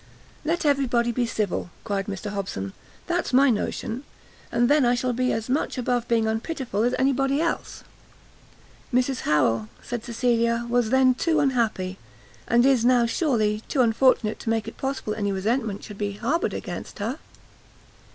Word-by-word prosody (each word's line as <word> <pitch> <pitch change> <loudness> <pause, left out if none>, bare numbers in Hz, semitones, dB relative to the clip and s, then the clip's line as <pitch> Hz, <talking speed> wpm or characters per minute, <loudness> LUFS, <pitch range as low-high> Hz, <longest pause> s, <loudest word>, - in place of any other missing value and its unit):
"Let 330 +2 -1
everybody 250 -5 +2
be 240 0 0
civil!" 210 -5 -2
cried 195 -1 -2
Mr 200 +1 -4
Hobson, 100 - -4 0.3
"that's 345 -5 -1
my 270 +1 +6
notion; 225 +3 -3 0.5
and 240 0 +3
then 290 +1 +4
I 245 0 +3
shall 250 0 -1
be 255 +1 +1
as 225 0 -2
much 260 +2 -1
above 245 -1 0
being 230 -2 +2
unpitiful 225 0 -2
as 245 +2 +2
anybody 270 +1 +2
else." 335 +1 -2 1.1
"Mrs 255 +1 +1
Harrel," 115 -7 +2 0.2
said 240 -2 -4
Cecilia, 235 -1 +1
"was 240 -2 +1
then 260 0 +5
too 315 +5 +1
unhappy, 225 -9 0 0.5
and 240 +1 +4
is 265 -4 +4
now, 245 -1 +4
surely, 225 -6 +1
too 275 - +1
unfortunate, 230 -1 +3
to - - -4
make 225 -1 0
it 225 - -7
possible 270 -5 -3
any 205 -2 -1
resentment 210 +1 -1
should 205 -2 -10
be 205 -1 -2
harboured 270 - -1
against - - -6
her." 235 +8 -3
240 Hz, 160 wpm, -25 LUFS, 215-265 Hz, 1.1 s, my